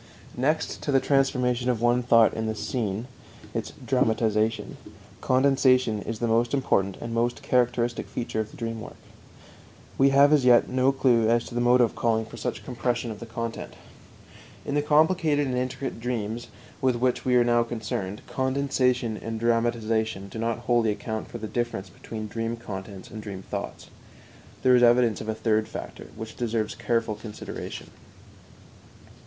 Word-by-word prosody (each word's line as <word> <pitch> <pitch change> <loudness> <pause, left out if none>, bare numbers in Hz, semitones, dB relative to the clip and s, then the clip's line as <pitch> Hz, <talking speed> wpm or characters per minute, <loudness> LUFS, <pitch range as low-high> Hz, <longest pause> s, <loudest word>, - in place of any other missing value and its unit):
Next 150 +6 -1
to 145 - -2
the 135 - +5
transformation 125 -3 +1
of 120 -3 +1
one 120 +1 +3
thought 115 -2 +5
in 110 0 -2
the 110 - -2
scene 110 -1 -3 0.5
(its - - -3
"dramatization"), 110 -1 +1 0.4
condensation 130 -4 +3
is 115 - -4
the 120 - -1
most 115 +3 +2
important 100 -8 +1
and 115 0 -6
most 120 +1 0
characteristic 120 -1 +1
feature 120 -2 -4
of 110 -1 -2
the 150 - -14
dream 115 -3 -4
work. - - -9 1.0
We 135 +1 +6
have 140 +2 +6
as 145 -3 +4
yet 120 -1 +6
no 130 +1 +2
clue 120 -4 +3
as 120 0 +2
to - - -10
the 120 - 0
motive 120 -1 +4
calling 110 -1 +1
for 115 - -11
such 105 - -4
compression 120 -1 -2
of 105 - -8
the 115 - -8
content. 115 0 -5 0.9
In 140 - -3
the 145 - +2
complicated 155 0 +3
and 130 -2 -2
intricate 130 0 -3
dreams 115 -1 -3 0.3
with 130 -2 +2
which 125 +1 0
we 125 -1 +2
are 120 - +6
now 120 0 +3
concerned, 110 -4 -4
condensation 130 -3 0
and 115 0 -5
dramatization 115 -3 0
do 110 - -7
not 115 +1 -1
wholly 120 -2 +3
account 110 +1 -3
for - - -7
the 110 - -6
difference 120 -4 -3
between 110 -1 -7
dream 115 +2 -3
contents 100 -3 -8
and 110 +1 -7
dream 100 -3 -7
thoughts. - - -6 0.7
There 130 -1 +6
is 125 - +4
evidence 120 -2 +4
of 110 - -6
a 110 - -1
third 110 -1 +1
factor, - - -8
which 110 0 -8
deserves 115 -3 -1
careful 115 0 -1
consideration. 105 0 -8
120 Hz, 165 wpm, -26 LUFS, 110-125 Hz, 1.0 s, We